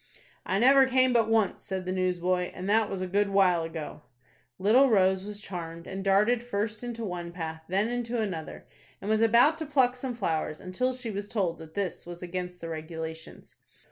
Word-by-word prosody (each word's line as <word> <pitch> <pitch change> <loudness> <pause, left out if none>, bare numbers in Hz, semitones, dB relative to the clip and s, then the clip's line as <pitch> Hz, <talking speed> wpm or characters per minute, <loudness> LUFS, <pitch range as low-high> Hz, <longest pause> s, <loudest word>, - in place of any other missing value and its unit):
"I 190 - +1
never 265 +4 +6
came 255 -1 +3
but 225 -2 +3
once," 220 -3 +2
said 190 -1 -4
the 185 - -2
newsboy, 180 -1 0
"and 185 +1 -5
that 215 +1 +3
was 190 - -4
a 185 - -2
good 200 +2 +1
while 190 -3 +4
ago." 165 -2 -6 0.6
Little 245 +8 +5
Rose 190 -3 +3
was 210 -1 -6
charmed, 170 -4 -7
and 190 0 -5
darted 210 +5 +3
first 215 -1 -3
into 230 -2 -4
one 175 -3 -5
path, 160 -2 -5
then 195 +4 +1
into 240 0 -2
another, 185 -8 -4 0.3
and 205 - -3
was 220 0 +2
about 235 +8 +5
to 320 - -3
pluck 260 -3 +3
some 250 -1 -4
flowers, 160 -7 -2
until 250 +8 -2
she 250 -3 -5
was 205 0 -5
told 180 -7 -1
that 160 -1 -12
this 195 -4 -3
was 175 0 -8
against 180 0 -5
the 165 - -5
regulations. 160 0 -7
195 Hz, 195 wpm, -28 LUFS, 175-230 Hz, 0.6 s, never